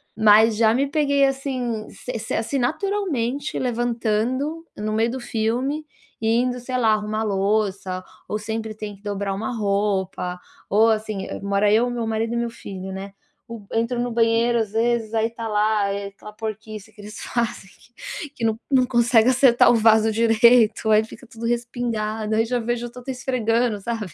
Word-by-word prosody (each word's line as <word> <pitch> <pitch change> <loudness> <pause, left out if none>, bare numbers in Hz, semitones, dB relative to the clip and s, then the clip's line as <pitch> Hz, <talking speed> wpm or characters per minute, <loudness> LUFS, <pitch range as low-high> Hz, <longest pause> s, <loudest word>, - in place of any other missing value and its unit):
mas 220 +1 +6
já 225 -1 +4
me 275 +3 +1
peguei, 280 -2 +2
assim, 255 -5 -2
se 250 - -6
se 220 - -5
assim, 260 +5 -1
naturalmente 290 - -1
levantando 245 +5 -1
no 215 +1 -2
meio 225 +2 +1
do 260 - -4
filme 245 +6 -1 0.4
e 220 - 0
indo, 250 0 -1
sei 255 +1 -3
lá, 225 -3 +3
arrumar 215 +1 -1
louça 195 -2 -1 0.2
ou 210 - -2
sempre 220 0 -4
tem 210 -1 -7
que 200 - -22
dobrar 200 -1 -2
uma 220 +4 -3
roupa, 195 -3 -1 0.3
ou 220 +3 +4
assim, 215 -3 -2
mora 200 +1 +2
eu, 235 +3 +3
meu 240 -2 -3
marido 225 +1 -1
e - - 0
meu 235 0 -1
filho, 190 -4 -8
né. 195 +1 -7 0.3
O 230 -4 -9
entro 230 +2 0
no 245 0 -1
banheiro, 230 +1 +2
às 215 -2 -2
vezes, 230 -1 0
aí 220 0 +2
está 230 0 -6
lá, 210 -1 +1
eh, 200 0 -3
aquela 200 +1 -12
porquice 215 -1 -7
que 205 - -14
eles 210 +1 -9
fazem 230 -5 -3
que 245 +4 -9
que 235 - -7
não 220 0 0
não 260 -3 +4
consegue 235 -1 +4
acertar 255 -2 +5
o - - +4
vaso 220 0 +4
direito, 225 0 +4
aí 215 0 +5
fica 225 +3 -12
tudo 230 0 -8
respingado, 225 -3 -2
aí 225 +1 +2
já 245 +1 -1
vejo, 240 +1 -2
eu - - -12
já 250 - -10
tô 265 - -4
esfregando, 240 -3 0
sabe, 215 -6 -4
225 Hz, 180 wpm, -23 LUFS, 215-240 Hz, 0.4 s, mas